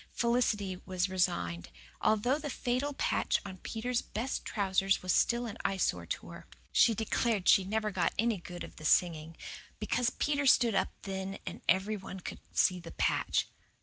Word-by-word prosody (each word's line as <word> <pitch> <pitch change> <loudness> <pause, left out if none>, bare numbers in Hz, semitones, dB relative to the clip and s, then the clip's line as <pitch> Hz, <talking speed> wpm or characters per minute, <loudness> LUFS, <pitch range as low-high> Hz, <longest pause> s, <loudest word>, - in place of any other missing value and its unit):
Felicity 215 -6 +1
was 185 0 -1
resigned, 90 - 0 0.3
although 230 +7 +2
the 295 -1 -4
fatal 255 +2 -1
patch - - +1
on 190 -2 -7
Peter's 240 +4 -2
best 240 +5 -3
trousers 195 -2 +1
was 185 - +1
still 240 0 +2
an 220 - -7
eyesore 195 -1 0
to - - -4
her. - - -11 0.2
She 230 - +5
declared 220 -2 0
she 195 - +7
never 215 +2 -1
got 185 -2 +1
any 230 -1 +2
good 175 0 -8
of - - -11
the 155 - -9
singing, 165 -1 +2 0.4
because 235 +3 +1
Peter 285 +2 0
stood 240 -3 +5
up 190 -1 +1
then 195 0 -4
and - - -6
every 195 +4 +2
one 190 -1 -8
could - - -7
see 185 -1 +3
the 170 -1 -10
patch. - - +1
200 Hz, 170 wpm, -31 LUFS, 185-235 Hz, 0.4 s, she